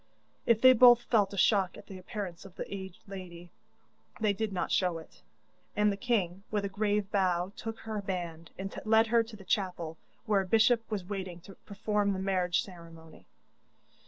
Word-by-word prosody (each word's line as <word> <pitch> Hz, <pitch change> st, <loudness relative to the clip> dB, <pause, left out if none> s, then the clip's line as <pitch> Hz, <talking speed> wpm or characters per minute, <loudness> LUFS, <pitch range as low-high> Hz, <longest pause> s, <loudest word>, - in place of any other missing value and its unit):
If 230 Hz, -1 st, +4 dB
they 255 Hz, 0 st, +9 dB
both 240 Hz, 0 st, +7 dB
felt 205 Hz, -5 st, +2 dB
a 200 Hz, -, -7 dB
shock 195 Hz, -2 st, +3 dB
at -, -, -12 dB
the 190 Hz, -2 st, -10 dB
appearance 185 Hz, -2 st, -6 dB
of 195 Hz, -2 st, -14 dB
the -, -, -5 dB
aged 190 Hz, -2 st, -8 dB
lady 175 Hz, -3 st, -9 dB, 0.7 s
they 215 Hz, -2 st, +2 dB
did 215 Hz, +1 st, -2 dB
not 185 Hz, -, -2 dB
show 180 Hz, -3 st, +1 dB
it, 160 Hz, -, -14 dB, 0.5 s
and 210 Hz, 0 st, +3 dB
the -, -, -2 dB
king, 195 Hz, -5 st, -1 dB
with 205 Hz, -2 st, -1 dB
a -, -, -2 dB
grave 205 Hz, 0 st, -1 dB
bow, 185 Hz, -2 st, +1 dB
took 225 Hz, 0 st, -6 dB
her 220 Hz, -2 st, -4 dB
band, 170 Hz, -4 st, -5 dB
and 195 Hz, +1 st, -5 dB
led 220 Hz, +1 st, +4 dB
her 230 Hz, +1 st, +3 dB
to 225 Hz, 0 st, -8 dB
the 195 Hz, -2 st, -13 dB
chapel, 180 Hz, -5 st, -2 dB, 0.3 s
where 210 Hz, -3 st, +3 dB
a 190 Hz, -, -6 dB
bishop 225 Hz, +3 st, +3 dB
was 205 Hz, -5 st, -3 dB
waiting 185 Hz, -3 st, -5 dB
to 195 Hz, +3 st, -13 dB
perform 205 Hz, 0 st, 0 dB
the 190 Hz, -, -3 dB
marriage 185 Hz, -2 st, +1 dB
ceremony. 165 Hz, -3 st, -14 dB
195 Hz, 190 wpm, -30 LUFS, 180-215 Hz, 0.7 s, they